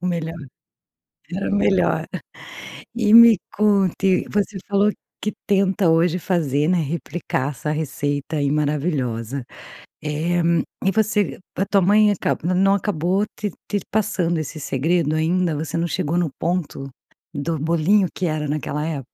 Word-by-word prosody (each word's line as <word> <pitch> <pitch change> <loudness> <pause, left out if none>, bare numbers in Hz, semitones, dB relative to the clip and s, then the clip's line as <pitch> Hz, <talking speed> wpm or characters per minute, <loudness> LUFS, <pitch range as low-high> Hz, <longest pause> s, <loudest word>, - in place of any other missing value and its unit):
O 180 - -3
melhor. 165 -2 -2 1.0
Era 195 +2 -2
o - - +1
melhor. 200 -1 +2 0.9
E 220 -3 +1
me 235 -1 +9 0.2
conte, 195 -2 +2
você 205 -1 -1
falou 205 +1 +3 0.3
que 210 - -2 0.2
tenta 195 -3 +3
hoje 165 +2 +3
fazer, 155 -5 0
né, 180 0 +3
replicar 155 -2 -3
essa 150 +2 -5
receita 145 0 -2
aí, 145 -2 +1
maravilhosa, 140 -5 -1 0.6
eh, 160 +4 0 0.4
e 195 - +3
você 210 0 0 0.2
a 195 - +1
tua 200 0 +2
mãe 210 +3 +4
acaba 180 -2 -1
não 195 +2 +4
acabou 190 0 0
te 210 - -2 0.2
te 205 - +1
passando 180 -6 0
esse 155 +1 -5
segredo 155 +3 0
ainda, 165 +2 +1
você 150 +1 -4
não 170 - 0
chegou 165 +1 -1
no 175 -2 +1
ponto 165 -5 -2 0.4
do 155 +3 -2
bolinho 170 +5 +2
que 185 - -2
era 155 -2 -2
naquela 150 0 -2
é 155 -3 -3
170 Hz, 145 wpm, -21 LUFS, 150-195 Hz, 1.0 s, me